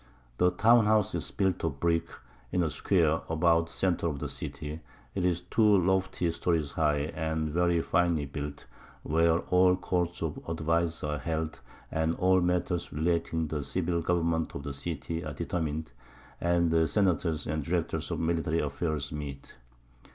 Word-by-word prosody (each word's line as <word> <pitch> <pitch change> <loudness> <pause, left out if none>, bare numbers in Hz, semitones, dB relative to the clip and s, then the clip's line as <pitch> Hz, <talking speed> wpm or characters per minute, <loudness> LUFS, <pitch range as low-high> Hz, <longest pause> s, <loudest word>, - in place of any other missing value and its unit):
The 90 - +5
Town 110 +4 +5
house 105 -2 +3
is - - -2
built 95 -3 0
of 70 -4 -2
Brick, 85 0 +1 0.4
in 90 - +2
a 80 - -1
Square, 80 -4 +2
about 80 0 +3
the - - -12
Center 90 -2 0
of 75 -3 -2
the 75 0 -4
City; 75 +2 -6 0.3
'tis 90 -1 0
two 105 +3 +4
lofty 95 -1 +1
Stories 80 -4 0
high, 75 0 +1
and 80 -1 -2
very 85 0 +2
finely 85 -5 +1
built, 70 +1 -6 0.4
where 80 +2 +3
all 90 0 +5
Courts 90 -2 -2
of 80 -2 -3
Advice 85 0 0
are 75 0 -2
held, 80 +2 -3 0.3
and 80 +1 0
all 95 0 +3
Matters 90 0 0
relating 80 +1 0
to 75 - -2
the - - -4
Civil 85 +3 -1
Government 85 -1 0
of 70 - -5
the 70 - -4
City 80 +3 -4
are 75 -2 -5
determin'd, 80 -5 -3 0.5
and 85 -1 +2
the 80 -1 +3
Senators 85 -6 +1
and 75 0 -2
Directors 80 0 -1
of - - -2
military 80 -1 0
Affairs 75 -1 -2
meet. 70 -2 -7
80 Hz, 160 wpm, -29 LUFS, 75-90 Hz, 0.5 s, The